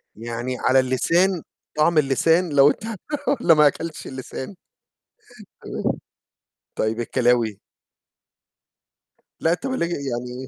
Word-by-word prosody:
يعني 120 Hz, +3 st, -4 dB
على 130 Hz, +1 st, +4 dB
اللسان 165 Hz, +8 st, +2 dB, 0.4 s
طعم 155 Hz, +2 st, +3 dB
اللسان 160 Hz, +5 st, +3 dB
لو 140 Hz, -1 st, +6 dB
أنت 180 Hz, -, -3 dB, 0.4 s
والّا 185 Hz, -11 st, +4 dB
ما 150 Hz, -1 st, +6 dB
أكلتش 160 Hz, +2 st, -4 dB
اللسان؟ 130 Hz, +6 st, -7 dB, 1.1 s
تمام. -, -, -3 dB, 0.8 s
طيب 110 Hz, +2 st, -1 dB
الكلاوي؟ 120 Hz, -4 st, +1 dB, 1.8 s
لأ، 165 Hz, -, +2 dB
طَب 260 Hz, +9 st, -3 dB
الج 170 Hz, -9 st, -1 dB
يعني 125 Hz, -3 st, -4 dB
135 Hz, 105 wpm, -22 LUFS, 125-165 Hz, 1.8 s, لو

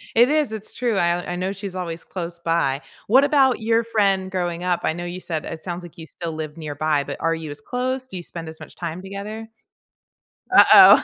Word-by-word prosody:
It 240 Hz, +3 st, +6 dB
is, 300 Hz, -6 st, +2 dB
it's 215 Hz, -1 st, -7 dB
true, 235 Hz, -4 st, 0 dB
I 175 Hz, 0 st, +1 dB
I -, -, -2 dB
know 185 Hz, +2 st, -2 dB
she's 195 Hz, -1 st, -6 dB
always 170 Hz, -3 st, -4 dB
close 170 Hz, -2 st, -6 dB
by, 165 Hz, -5 st, +1 dB, 0.3 s
what 260 Hz, +6 st, +6 dB
about 270 Hz, -4 st, +4 dB
your 225 Hz, +1 st, +2 dB
friend 200 Hz, -4 st, +1 dB
growing 175 Hz, -2 st, -2 dB
up? 180 Hz, -1 st, +1 dB
I 160 Hz, -, +1 dB
know 175 Hz, +1 st, -5 dB
you 175 Hz, +1 st, -5 dB
said 160 Hz, -4 st, -4 dB
it 160 Hz, -, -6 dB
sounds 175 Hz, +1 st, -5 dB
like 175 Hz, 0 st, -12 dB
you 160 Hz, -, -8 dB
still 170 Hz, -2 st, -6 dB
live 155 Hz, -1 st, -5 dB
nearby, 150 Hz, -1 st, -1 dB
but -, -, -6 dB
are 165 Hz, 0 st, +1 dB
you 160 Hz, -2 st, -6 dB
as 145 Hz, -, -8 dB
close? 255 Hz, -, -2 dB
Do 190 Hz, -, -9 dB
you 175 Hz, -, -5 dB
spend 165 Hz, -1 st, -8 dB
as 160 Hz, 0 st, -9 dB
much -, -, -11 dB
time 170 Hz, +1 st, -5 dB
together? 205 Hz, +3 st, -6 dB, 1.1 s
Uh-oh -, -, +9 dB
180 Hz, 225 wpm, -22 LUFS, 165-215 Hz, 1.1 s, Uh-oh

